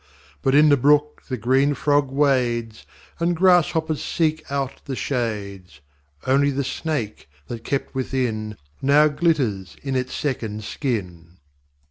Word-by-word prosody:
But 135 0 +2
in 150 +1 +6
the 145 - +5
brook 150 +3 +2
the 130 - -2
green 135 +5 +2
Frog 145 0 +2
wades; 125 -5 0 0.3
And 170 +1 +1
Grass 180 -1 +5
hoppers 160 -2 -1
seek 155 -1 0
out 135 -2 -3
the 135 - -4
shades. 100 - -4 0.5
Only 140 +2 +3
the 140 0 -1
Snake, 130 - -4 0.2
that 115 -2 -6
kept 140 +2 -2
within, 120 -5 -2 0.2
Now 145 +3 +5
glitters 135 - 0
in 135 -2 -2
its 130 0 -2
second 110 -7 -3
skin. 90 - -4
135 Hz, 135 wpm, -22 LUFS, 115-145 Hz, 0.5 s, in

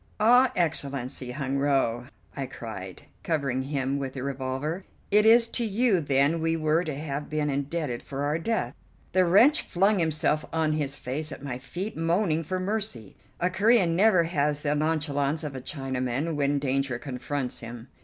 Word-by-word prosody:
"Ah, 245 +4 +6
Excellency 140 -6 -2
Hun 135 +1 -2
Woe!" 135 -4 +1 0.3
I 135 -2 -3
cried, 105 -7 -8 0.2
covering 140 -5 -1
him 135 0 -1
with 135 -1 -4
the 130 - -5
revolver, 135 +6 -3 0.3
"it 210 +2 +5
is 230 +1 +6
to 240 - -1
you 220 -3 +2
then 140 +3 +2
we 165 0 +1
were 155 +2 +2
to 155 -5 -4
have 145 0 -4
been 150 -1 0
indebted 140 -2 -2
for 140 0 -5
our 150 +3 0
death." 225 +6 -1 0.4
The 185 -1 +4
wretch 225 - +5
flung 195 +3 +2
himself 155 -2 +1
on 160 -1 +1
his 145 -2 -1
face 145 +3 -4
at - - -8
my 125 -3 -4
feet, 180 +11 -5
moaning 165 0 +1
for 185 +4 -3
mercy. 185 - -3 0.2
A 180 +1 +1
Corean 195 -3 +3
never 190 -2 +5
has 150 -3 0
the 145 -1 +1
nonchalance 150 -1 0
of 145 -3 -5
a 130 - -5
Chinaman 135 +2 -2
when 145 0 +1
danger 135 -2 0
confronts 130 0 -4
him. 115 +1 -9
150 Hz, 170 wpm, -27 LUFS, 135-170 Hz, 0.4 s, Ah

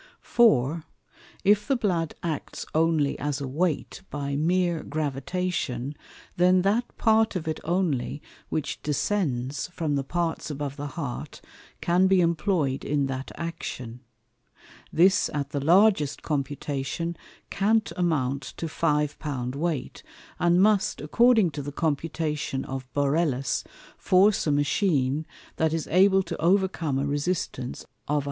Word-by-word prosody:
For, 165 - +3 0.6
if 205 +1 +3
the 275 - +2
Blood 180 -9 -1
acts 160 -4 -4
only 160 -3 +2
as 145 0 -2
a 140 - -4
weight 160 +6 -1
by 140 -1 -3
meer 175 +2 +1
gravitation, 145 -2 -2 0.4
then 180 +1 +4
that 220 +5 0
part 220 -1 +3
of 170 -3 -3
it 155 - -2
only 155 -6 0 0.3
which 155 - -3
descends 145 -5 -1
from 165 -4 -2
the 140 -1 0
Parts 170 +3 -2
above 145 -1 -4
the 145 0 -5
Heart 140 -7 -5 0.4
can 180 +2 +3
be 190 -1 +4
employ'd 165 -5 +1
in 145 -1 0
that 135 0 -4
Action. 125 -8 -6 0.9
This 185 +4 +4
at 145 -1 -2
the 140 -1 -2
largest 175 -3 +4
computation 145 +3 -2 0.4
can't 220 +2 +2
amount 140 -6 0 0.2
to 165 - -3
Five 150 -2 0
pound 130 -5 -3
weight, 150 -2 -3 0.4
and 175 0 +4
must, 205 0 +3
according 220 - +4
to 145 - -5
the 145 +1 -5
computation 150 -2 -2
of 130 -1 -6
Borellus, 140 -2 +1 0.4
force 190 0 +4
a - - +3
Machine, 145 -1 +1 0.3
that 160 0 +1
is 165 -2 -1
able 190 +2 +5
to 170 - -5
overcome 175 -5 +2
a 135 - 0
resistance 145 -3 -2 0.2
of 150 - +1
135,000_l. - - +3
155 Hz, 135 wpm, -26 LUFS, 140-180 Hz, 0.9 s, able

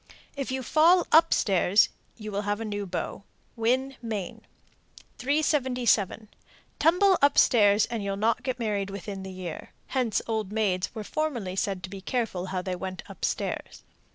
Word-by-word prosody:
If 275 -2 -4
you 260 0 -2
fall 335 +7 +4
up 330 +1 +6
stairs, 195 +1 +3 0.3
you 215 -2 -7
will 200 0 -1
have 205 +1 -2
a 225 - -4
new 205 -1 -4
beau. 185 +2 -4 0.3
Winn, 255 +4 0
Me. 215 -6 -4 0.8
377. 250 - +1 0.5
Tumble 360 +4 +4
up 285 0 +4
stairs 205 -2 +5
and 230 -3 -4
you'll 195 0 -2
not 225 +3 +1
get 255 -2 -3
married 205 -4 -1
within 195 0 -6
the 190 - -7
year. 185 -3 -7 0.2
(Hence 250 -5 0
old 220 -3 -2
maids 200 -4 0
were 215 - -4
formerly 240 -9 -3
said 195 -2 -2
to 190 - -5
be 195 -1 -7
careful 200 -5 -2
how 185 -1 -3
they 185 -1 -3
went 185 0 -6
up - - -12
stairs.) - - -3
215 Hz, 165 wpm, -27 LUFS, 195-255 Hz, 0.8 s, up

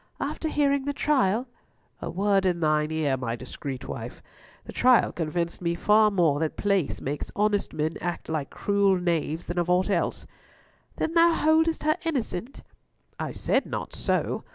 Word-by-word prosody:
"After 315 - -3
hearing 280 -2 +1
the 285 - -1
trial?" 255 -5 +1 0.5
"A - - -4
word 195 +2 +2
in 175 -2 0
thine 155 -1 +2
ear, 155 -4 0
my 120 -3 -3
discreet 130 +1 -7
wife. - - -7 0.4
The - - -9
trial 250 -1 +4
convinced 170 +1 -3
me 170 -1 0
far 210 +4 +4
more 170 -8 +2
that 160 -1 -2
place 200 -7 0
makes 145 +2 -4
honest 205 -1 +1
men 155 +2 -2
act 175 0 -4
like 155 -3 -2
cruel 200 -2 +2
knaves 165 -2 -1
than 175 +1 -2
of 175 0 -1
aught 180 +3 +2
else." 175 -3 -1 0.7
"Then 320 - -2
thou 335 0 +5
holdest 320 0 +2
her 310 0 +2
innocent?" 260 - -3 0.6
"I - - -3
said - - 0
not - - -5
so. - - -1
185 Hz, 165 wpm, -26 LUFS, 160-250 Hz, 0.7 s, thou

